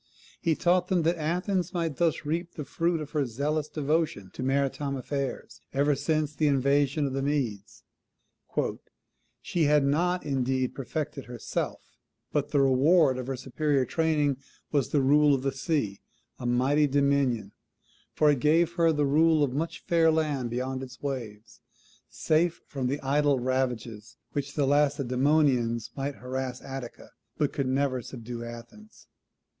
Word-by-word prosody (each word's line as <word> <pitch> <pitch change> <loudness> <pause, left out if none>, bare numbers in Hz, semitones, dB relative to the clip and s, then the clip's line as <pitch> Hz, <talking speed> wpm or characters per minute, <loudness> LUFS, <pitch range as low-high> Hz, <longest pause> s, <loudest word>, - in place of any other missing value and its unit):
He 165 -3 +2
taught 180 +2 +2
them 180 -3 +1
that 170 +1 +1
Athens 180 +3 -1
might 165 -5 -1
thus 165 -3 +1
reap 170 +3 -3
the 150 - -5
fruit 165 +1 0
of 150 -1 -7
her 150 -3 +1
zealous 145 +5 -2
devotion 150 - -1
to - - -7
maritime 140 +1 0
affairs 135 +1 -4
ever 140 +2 +3
since 150 +1 0
the 150 +1 +1
invasion 140 +1 +2
of 135 - -2
the 135 - -1
Medes; 115 -7 -2 1.6
"she 170 -3 0
had 150 -1 +4
not, 175 +6 +1
indeed, 130 -2 0
perfected 145 0 -4
herself; 120 -2 -4 0.5
but 145 -2 0
the 145 - +2
reward 135 +1 +4
of 125 - -5
her 135 - -2
superior 135 +1 0
training 150 -2 +1 0.3
was 140 -4 +1
the 145 -3 +2
rule 145 +1 +5
of 130 - -4
the 135 - +1
sea 135 - -2 0.4
a 120 - -3
mighty 135 +5 +3
dominion, 140 -4 +1 0.6
for 150 -1 +5
it 140 - 0
gave 160 +5 +3
her 165 -1 +4
the 150 -2 +1
rule 155 +2 +4
of 135 -3 0
much 160 +4 -3
fair 165 -1 +4
land 150 -6 0
beyond 130 +2 -3
its 125 -1 -9
waves, 115 -6 -6 0.5
safe 165 +2 +1
from 135 -3 -3
the 140 +3 -1
idle 145 +1 +2
ravages 125 -4 -2 0.2
with 145 -1 -1
which 140 - -12
the 145 - +2
Lacedaemonians 135 -4 +2
might 140 +1 -3
harass 130 0 -4
Attica, 135 -3 -8 0.3
but 145 - 0
never 130 0 +1
could 120 - -10
subdue 120 -1 -7
Athens." 120 - -11
140 Hz, 155 wpm, -28 LUFS, 130-155 Hz, 1.6 s, rule